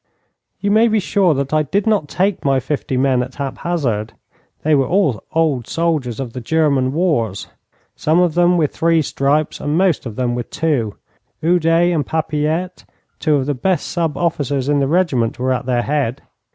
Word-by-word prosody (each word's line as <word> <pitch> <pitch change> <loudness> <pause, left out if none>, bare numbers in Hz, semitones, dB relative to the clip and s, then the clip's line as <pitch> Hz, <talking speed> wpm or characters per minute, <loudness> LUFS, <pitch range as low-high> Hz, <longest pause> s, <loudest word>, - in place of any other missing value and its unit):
You 200 - 0
may 220 +3 +5
be 220 -1 +2
sure 190 -4 +2
that 140 +1 -2
I 155 - +4
did 195 +7 -1
not 210 -9 +1
take 190 +5 -1
my 135 -1 +2
fifty 135 0 -3
men 130 -1 +2
at 125 +1 -6
hap 140 -2 -5
hazard. 120 -11 -2 0.5
They 155 - +2
were 135 -3 +3
all 160 - +1
old 155 -7 +1
soldiers 155 -8 -1
of 125 -4 -5
the 125 - -6
German 140 -1 +1
wars, 145 - -1 0.5
some 160 +3 +1
of 175 -3 +2
them 175 +1 +3
with 155 -4 0
three 165 -1 +2
stripes, 145 +2 0
and 145 +2 -1
most 180 -8 +1
of 110 - -8
them 125 -1 -1
with 120 -1 -4
two. 135 -10 -1 0.5
Oudet 170 +1 +3
and 155 -3 +1
Papilette, 160 +3 -2 0.4
two 155 -3 +2
of 135 -2 0
the 145 - 0
best 175 +5 0
sub 165 -3 -1
officers 145 -5 -1
in 145 0 +2
the 135 - +1
regiment, 145 -10 +1
were 130 +1 0
at 125 0 -4
their 120 -2 +1
head. 140 -4 -1
150 Hz, 190 wpm, -18 LUFS, 130-170 Hz, 0.5 s, may